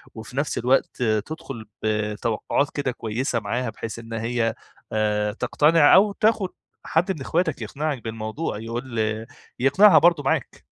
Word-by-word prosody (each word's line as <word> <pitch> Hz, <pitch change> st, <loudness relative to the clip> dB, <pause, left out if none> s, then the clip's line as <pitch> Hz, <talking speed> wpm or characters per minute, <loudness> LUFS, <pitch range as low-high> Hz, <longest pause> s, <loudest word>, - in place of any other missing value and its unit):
وفي 115 Hz, +4 st, -9 dB
نفْس 145 Hz, 0 st, -1 dB
الوقت 125 Hz, 0 st, +1 dB
تدخل 115 Hz, +2 st, -3 dB, 0.2 s
بتوقعات 110 Hz, +5 st, 0 dB
كده 140 Hz, -3 st, -1 dB
كويسة 120 Hz, +1 st, -2 dB
معاها 120 Hz, +2 st, -2 dB
بحيث 115 Hz, +1 st, -7 dB
إن 115 Hz, 0 st, -9 dB
هي، 115 Hz, 0 st, -1 dB, 0.4 s
آآ 105 Hz, -1 st, 0 dB
تقتنع 145 Hz, +7 st, +4 dB
أو 200 Hz, +2 st, +5 dB
تاخد 215 Hz, -3 st, +1 dB, 0.3 s
حد 175 Hz, +4 st, +1 dB
من 155 Hz, -, -5 dB
أخواتك 160 Hz, -2 st, -1 dB
يقنعك 140 Hz, +3 st, -3 dB
بالموضوع، 110 Hz, +3 st, -4 dB
يقول 115 Hz, +1 st, -5 dB, 0.6 s
يقنعها 185 Hz, +11 st, +6 dB
برضه 170 Hz, -4 st, +4 dB
معاك. -, -, -1 dB
125 Hz, 135 wpm, -24 LUFS, 110-150 Hz, 0.6 s, يقنعها